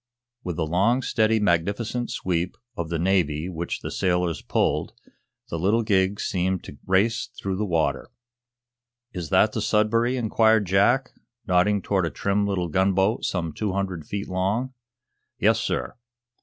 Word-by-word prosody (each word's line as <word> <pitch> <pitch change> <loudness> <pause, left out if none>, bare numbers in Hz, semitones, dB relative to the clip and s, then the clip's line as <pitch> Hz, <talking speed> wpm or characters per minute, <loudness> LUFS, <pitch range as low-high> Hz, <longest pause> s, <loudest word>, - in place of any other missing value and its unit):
With 90 -2 -3
the 80 - -1
long, 100 +11 +2
steady, 110 -1 +2
magnificent 105 +6 0
sweep 90 0 -2 0.2
of 85 -5 -4
the 85 - -1
Navy 85 -3 +1
which 85 -2 -4
the - - -5
sailors 90 -4 0
pulled, - - 0 0.6
the 85 - -3
little 105 +7 +2
gig 100 -2 +1
seemed 95 -1 -1
to 70 - -11
race 105 +6 +2
through 95 -1 -2
the 105 +1 -1
water. 80 -6 0 1.0
"Is 85 -5 -5
that - - +4
the - - -3
'Sudbury'?" 115 +4 +2
inquired 110 -2 +3
Jack, 100 +8 +2 0.3
nodding 95 +2 +2
toward 95 -4 +1
a - - -2
trim 100 +3 0
little 95 -3 -1
gunboat 95 +5 +1
some 85 -4 -2
two 105 +3 -2
hundred 95 -5 -3
feet 100 0 -4
long. 100 +8 -1 0.6
"Yes, - - +3
sir." 60 - -2
95 Hz, 150 wpm, -24 LUFS, 85-105 Hz, 1.0 s, that